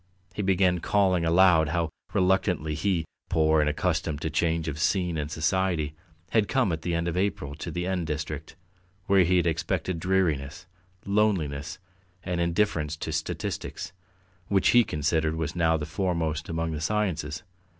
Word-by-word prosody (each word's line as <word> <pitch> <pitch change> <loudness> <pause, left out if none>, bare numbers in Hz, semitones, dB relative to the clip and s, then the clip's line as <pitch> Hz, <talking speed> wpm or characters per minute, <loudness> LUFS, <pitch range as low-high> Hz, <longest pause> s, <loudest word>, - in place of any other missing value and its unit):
He 105 - -3
began 95 -2 +2
calling 95 -2 +2
aloud 85 -2 +5
how 85 -1 0 0.2
reluctantly 90 -4 +1
he, 85 +1 0 0.2
poor 80 -2 +3
and 75 - +1
unaccustomed 80 -1 -1
to 80 - -2
change 80 +1 0
of 75 -1 -4
scene 90 0 +1
and 75 -2 -3
society, 80 -1 0 0.4
had 110 -3 +3
come 130 -8 +1
at 80 -1 -3
the 85 0 -1
end 85 +1 -1
of 85 - -2
April 95 -6 -1
to 80 - -5
the 90 +2 -3
N 90 -2 -1
District, 75 -1 -5 0.5
where 100 -3 +5
he 90 +2 +3
had 90 - +2
expected 85 +1 -1
dreariness, 85 -4 0 0.4
loneliness, 85 -8 0 0.5
and 90 -2 -2
indifference 85 -3 0
to 80 - -5
statistics, 80 +3 -4 0.5
which 95 -2 +3
he 120 0 +6
considered 80 -1 0
was 80 -1 -3
now 80 -2 +3
the 75 - -4
foremost 80 -2 -2
among 80 0 -2
the 75 -1 -4
sciences. 90 -6 -1
85 Hz, 160 wpm, -27 LUFS, 80-95 Hz, 0.5 s, he